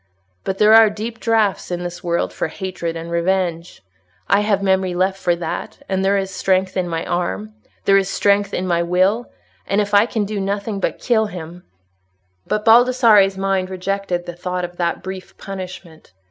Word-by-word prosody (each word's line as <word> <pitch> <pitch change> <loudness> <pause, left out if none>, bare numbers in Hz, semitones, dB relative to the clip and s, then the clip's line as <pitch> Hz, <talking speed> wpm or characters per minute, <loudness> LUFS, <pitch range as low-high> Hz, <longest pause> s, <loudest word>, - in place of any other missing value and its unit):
But 190 - -3
there 210 +1 +5
are 225 -1 +8
deep 220 +2 -6
draughts 220 -4 +1
in 175 0 -3
this 175 0 -6
world 170 -1 -1
for - - -2
hatred 175 -1 -5
and 165 +1 -7
revenge. 170 -1 -1 0.4
I 200 - +4
have 205 -1 +1
memory 190 -2 +1
left 190 +2 0
for 175 -2 +1
that, 170 -1 -5
and 190 0 -1
there 195 +1 +3
is 195 -1 -2
strength 190 0 0
in 180 -2 -1
my 165 -1 -3
arm—there 195 +3 -1
is 195 0 +1
strength 200 0 +2
in 185 - -2
my 170 -2 +1
will—and 180 - -1
if 205 0 -1
I 205 +3 +5
can 220 -3 -1
do 205 0 -4
nothing 200 +1 -2
but - - -1
kill 220 -3 +1
him—" 175 -2 -9 0.8
But 210 0 -1
Baldassarre's 225 -4 +5
mind 195 -1 0
rejected 185 -1 -3
the 175 - -6
thought 180 +1 -3
of 175 0 -11
that 170 -1 -1
brief 190 0 -8
punishment. 185 - -9
190 Hz, 175 wpm, -20 LUFS, 175-205 Hz, 0.8 s, are